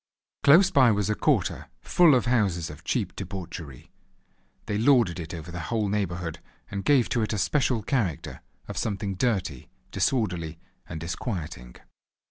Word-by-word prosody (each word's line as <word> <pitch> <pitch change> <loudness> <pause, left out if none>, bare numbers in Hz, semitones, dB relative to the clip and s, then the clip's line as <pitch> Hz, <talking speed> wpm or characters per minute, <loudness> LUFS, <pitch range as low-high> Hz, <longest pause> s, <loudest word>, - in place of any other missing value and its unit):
Close 175 +7 +6
by 130 -3 +6
was 105 0 0
a - - +3
quarter - - 0
full 170 -6 +5
of 125 - +1
houses 100 -10 +1
of 75 - -13
cheap - - -1
debauchery. 85 -7 -7 0.7
They 105 0 -2
lorded 115 -8 +3
it 80 - -6
over 85 0 -7
the 90 - -5
whole 110 -3 0
neighbourhood, 90 -5 -2 0.3
and 100 -1 -3
gave 140 -5 +4
to 120 - 0
it 110 - -1
a - - -1
special 125 0 +1
character 95 - -2 0.3
of - - -4
something 100 -2 -2
dirty, 95 - -1 0.2
disorderly 90 - -1 0.3
and 80 - -5
disquieting. 80 - -5
100 Hz, 150 wpm, -26 LUFS, 85-120 Hz, 0.7 s, Close